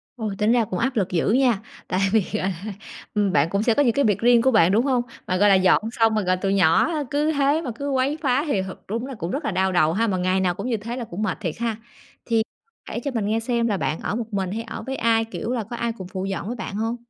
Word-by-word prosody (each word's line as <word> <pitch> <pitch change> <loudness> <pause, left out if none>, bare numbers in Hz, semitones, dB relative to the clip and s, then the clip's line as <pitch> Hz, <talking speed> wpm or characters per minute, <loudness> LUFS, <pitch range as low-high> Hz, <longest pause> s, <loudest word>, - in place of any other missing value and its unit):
Ôi, 215 -4 -4
tính 215 +2 +2
ra 240 -2 +3
cũng 185 -2 -4
áp 260 +1 0
lực 195 -4 +1
dữ 175 +2 0
nha! 245 -5 +3 0.3
Tại 185 - -1
vì, 220 -3 +3
gọi 195 -2 0 0.2
là, 210 - -4 0.4
ừm, 205 -2 +1
bạn 145 +1 +3
cũng 200 +3 0
sẽ 230 - +3
có 290 - +3
những 235 -3 +3
cái 280 - +2
việc 205 -2 +2
riêng 240 0 +5
của 260 +2 +3
bạn, 190 -5 +5
đúng 230 +6 +3
hông? 255 -3 +2 0.3
Mà, 185 - 0
gọi 205 +1 +5
là, 195 - +6
dọn 185 +2 +4
xong, 225 -3 +2
ờ, 210 - +1
rồi 185 0 +1
tụi 195 +1 0
nhỏ 180 - +4 0.2
cứ 300 +2 +1
thế 285 +2 +2
mà 255 -7 -4
cứ 280 +2 -4
quấy 270 +3 +1
phá 270 0 +2
thì 200 -9 +1
thật 190 0 -9
đúng 230 +5 -3
là 270 -2 -7
cũng 170 -2 -4
rất 285 +1 -3
là - - 0
đau 190 +1 +1
đầu 160 -2 +3
ha, 225 +4 +1
mà 190 -3 0
ngày 185 +1 +1
nào 180 -2 +1
cũng - - -5
như 230 - +1
thế 230 +4 -6
là 245 - -3
cũng 195 -1 -6
mệt - - -1
thiệt 165 -5 -3
ha. 230 -2 -1 0.5
Thì 225 -2 +2 0.4
kể - - -4
cho 280 - -2
mình 225 -5 -1
nghe 220 +2 +1
xem 235 0 0
là 205 -3 0
bạn 155 - -2
ở 210 - -3
một 225 -2 -5
mình 190 -2 -1
hay 225 +2 -3
ở 220 - -7
với 265 +2 -4
ai, 225 0 +2
kiểu, 230 +1 -5
là 235 -4 -1
có 235 +4 -7
ai 235 0 -1
cùng 185 -2 -7
phụ 190 0 -4
dọn 195 +1 -4
với 245 - -3
bạn 215 -3 -6
hông? 225 +2 -1
220 Hz, 300 wpm, -23 LUFS, 190-245 Hz, 0.5 s, là